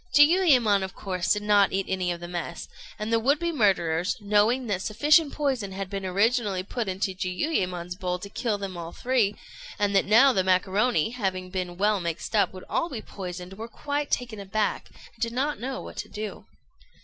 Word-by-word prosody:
Jiuyémon, 290 Hz, -, +5 dB
of 190 Hz, -1 st, -5 dB
course, 185 Hz, -3 st, -2 dB
did 210 Hz, 0 st, +2 dB
not 205 Hz, -1 st, +4 dB
eat 195 Hz, 0 st, -1 dB
any 185 Hz, -2 st, -1 dB
of 170 Hz, -, -4 dB
the 175 Hz, -, -7 dB
mess; 175 Hz, -1 st, -5 dB, 0.3 s
and 215 Hz, +2 st, -3 dB
the 230 Hz, -, +4 dB
would 275 Hz, +6 st, +3 dB
be 340 Hz, +2 st, -1 dB
murderers, 180 Hz, -, +1 dB
knowing 210 Hz, +5 st, +2 dB
that 200 Hz, -5 st, -1 dB
sufficient 295 Hz, -, +3 dB
poison 260 Hz, -10 st, -1 dB
had 195 Hz, 0 st, -5 dB
been 195 Hz, -1 st, -3 dB
originally 200 Hz, 0 st, +1 dB
put 225 Hz, +3 st, -4 dB
into 190 Hz, 0 st, -1 dB
Jiuyémon's 180 Hz, -, -2 dB
bowl 180 Hz, -2 st, -2 dB
to 180 Hz, -, -8 dB
kill 215 Hz, +1 st, -2 dB
them 195 Hz, -2 st, -5 dB
all 170 Hz, -1 st, -6 dB
three, 240 Hz, -5 st, +1 dB, 0.4 s
and 205 Hz, -1 st, +1 dB
that 195 Hz, -, +4 dB
now 235 Hz, +7 st, +6 dB
the 190 Hz, -, +2 dB
macaroni, 190 Hz, +2 st, +2 dB
having 190 Hz, -6 st, -3 dB
been 180 Hz, -2 st, -4 dB
well 205 Hz, +1 st, +2 dB
mixed 170 Hz, +4 st, -4 dB
up, 205 Hz, -, +3 dB
would 185 Hz, -1 st, -10 dB
all 335 Hz, -, -1 dB
be 250 Hz, -, -5 dB
poisoned, 180 Hz, -1 st, -7 dB
were 225 Hz, -, -5 dB
quite 290 Hz, +4 st, -3 dB
taken 240 Hz, -4 st, -2 dB
aback, 200 Hz, +2 st, -2 dB, 0.2 s
and 230 Hz, -, -25 dB
did 230 Hz, -1 st, -1 dB
not 280 Hz, +4 st, -1 dB
know 260 Hz, +2 st, -4 dB
what -, -, -10 dB
to -, -, -5 dB
do. 210 Hz, -1 st, -6 dB
205 Hz, 195 wpm, -26 LUFS, 185-240 Hz, 0.4 s, now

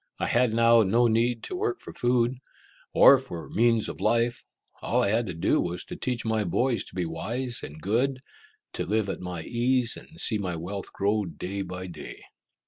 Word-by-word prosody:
I -, -, 0 dB
had 120 Hz, -1 st, +2 dB
now 115 Hz, +1 st, +5 dB
no 115 Hz, +4 st, +3 dB
need 115 Hz, +1 st, +1 dB
to -, -, -4 dB
work 390 Hz, 0 st, -1 dB
for -, -, -10 dB
food, 120 Hz, 0 st, +1 dB, 0.5 s
or 135 Hz, -, +7 dB
for 90 Hz, -11 st, -8 dB
means 115 Hz, 0 st, +3 dB
of -, -, -7 dB
life; 120 Hz, +1 st, +1 dB, 0.4 s
all -, -, +1 dB
I -, -, +2 dB
had 115 Hz, +2 st, +1 dB
to 90 Hz, -, -4 dB
do 80 Hz, -, +2 dB
was 90 Hz, 0 st, -3 dB
to -, -, -8 dB
teach 125 Hz, -2 st, -3 dB
my 110 Hz, -1 st, +1 dB
boys 120 Hz, +7 st, 0 dB
to -, -, -12 dB
be 90 Hz, -2 st, -1 dB
wise 115 Hz, +10 st, -3 dB
and 75 Hz, +2 st, -8 dB
good, 120 Hz, -, 0 dB, 0.6 s
to -, -, -2 dB
live 110 Hz, -1 st, 0 dB
at -, -, -4 dB
my 90 Hz, -3 st, -5 dB
ease, 120 Hz, +2 st, +1 dB
and 165 Hz, -, -12 dB
see 110 Hz, -, +2 dB
my 90 Hz, -4 st, -3 dB
wealth 95 Hz, +4 st, -5 dB
grow 105 Hz, +1 st, 0 dB
day 95 Hz, +3 st, -5 dB
by 90 Hz, 0 st, -6 dB
day. 90 Hz, -, -9 dB
115 Hz, 200 wpm, -27 LUFS, 95-120 Hz, 0.6 s, or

